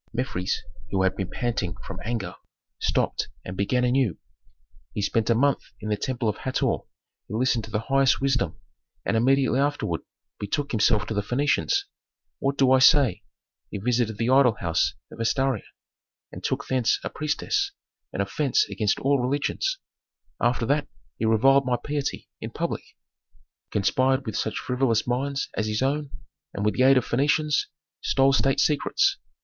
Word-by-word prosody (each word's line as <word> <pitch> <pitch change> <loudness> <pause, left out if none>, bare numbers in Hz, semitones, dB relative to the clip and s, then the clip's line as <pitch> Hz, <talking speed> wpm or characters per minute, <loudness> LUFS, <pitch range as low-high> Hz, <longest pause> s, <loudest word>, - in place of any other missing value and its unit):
Mefres, 110 -7 -2 0.3
who 95 -1 +1
had 95 - +2
been 95 -2 -3
panting 115 -9 -2
from - - -7
anger, 115 -2 -3 0.5
stopped - - 0 0.2
and 90 - -6
began 125 +6 +1
anew, 125 - +2 0.8
"He 105 - -1
spent 110 +2 0
a 115 - +4
month 140 +4 +2 0.2
in 110 - -5
the 105 - +2
temple 120 +2 -2
of 105 - 0
Hator, 130 - 0 0.5
he 105 - -5
listened 120 -2 +1
to - - -12
the 105 0 -1
highest 135 +2 +3
wisdom, 135 -2 0 0.5
and - - +1
immediately 130 +3 +3
afterward 140 - 0 0.4
betook 140 +8 -2
himself 105 -1 +3
to 110 - -4
the 105 - 0
Phœnicians. 140 - +1 0.6
What 140 0 0
do 135 -1 +4
I 130 - +6
say? 130 - +5 0.5
He - - -5
visited 115 0 0
the 115 +3 +1
idol 130 -4 +5
house 85 -1 +1 0.2
of - - -12
Astarte 130 +3 +1 0.7
and - - -9
took - - -1
thence 125 -3 +2
a - - -2
priestess 395 - -1 0.4
an - - -2
offence 425 - +1
against 105 -2 0
all 140 0 +3
religions. 145 - -1 0.6
After 120 -1 +2
that 145 +3 +1 0.3
he - - 0
reviled 130 +5 +4
my 125 -1 +2
piety, 145 0 -3
in - - -5
public; - - -3 0.9
conspired 130 +6 +1
with 110 - -4
such 110 - -1
frivolous 125 -3 +1
minds 135 +3 -1
as 110 - -1
his 110 +3 -1
own, 145 +1 0 0.5
and 100 - -2
with 105 - +2
the - - -1
aid 135 +1 +6
of 125 - +1
Phœnicians 150 +3 +2 0.4
stole 135 0 +3
state 135 0 +2
secrets. 390 - +2
125 Hz, 165 wpm, -25 LUFS, 110-135 Hz, 0.9 s, I